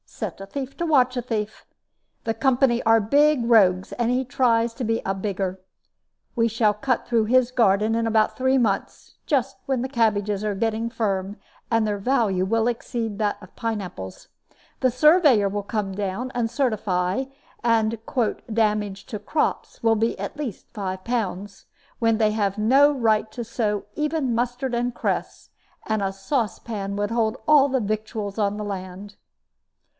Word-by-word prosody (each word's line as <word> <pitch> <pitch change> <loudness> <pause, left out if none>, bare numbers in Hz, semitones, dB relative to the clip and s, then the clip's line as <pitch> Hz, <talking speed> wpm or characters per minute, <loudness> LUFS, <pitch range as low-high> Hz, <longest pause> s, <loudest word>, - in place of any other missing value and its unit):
Set - - -6
a - - -6
thief 270 +6 -6
to 340 - -1
watch 260 -5 +3
a 245 - -1
thief. 220 -3 -4 0.6
The 225 - 0
company 245 +1 +2
are 225 0 +5
big 280 +4 +3
rogues, 190 -6 +4
and 240 0 0
he 255 +1 +1
tries 235 -2 +2
to 260 - -4
be 225 0 0
a 195 - 0
bigger. 190 -1 -3 0.8
We 230 -2 +3
shall 220 -2 +2
cut 245 +4 -1
through 230 -2 +2
his 250 +2 +3
garden 220 -2 +3
in 230 0 0
about 220 -1 +2
three 260 +1 +2
months, 215 -6 -2
just 270 -2 0
when 265 -3 0
his 260 - -4
cabbages 210 -4 +1
are 210 -1 -1
getting 225 +2 -1
firm, 200 -3 -2 0.3
and 225 -1 +2
their 210 -1 -1
value 200 -5 +1
will 225 +3 +1
exceed 230 -2 -3
that 210 -1 0
of 185 - -15
pine 225 -2 -2
apples. 95 - -8 0.5
The 255 - +3
surveyor 285 - +5
will 205 +1 -3
come 205 -1 -2
down 205 +6 -3
and 235 -2 0
certify, 215 -4 0 0.4
and 230 -1 +2
the 240 -5 0
'damage 210 -2 0
to 225 - -5
crops' 295 +9 -2
will 225 -1 +3
be 225 +2 0
at - - -5
least 275 -9 -5
five 190 -3 -4
pounds, 205 -4 -3 0.3
when 225 -1 +2
they 215 -1 +3
have 205 -2 -1
no 270 +7 +5
right 220 -5 +1
to 240 +2 -5
sow 215 -2 -2
even 300 -5 -1
mustard 245 +2 -2
and 240 +1 0
cress, - - -3 0.4
and 215 -1 -1
a 195 -1 0
saucepan 200 -1 -3
would 205 +1 -2
hold 230 +1 0
all 285 -2 +6
the 265 0 +1
victuals 215 -1 -3
on 205 0 0
the 210 - -4
land." 195 0 -7
225 Hz, 170 wpm, -24 LUFS, 205-245 Hz, 0.8 s, all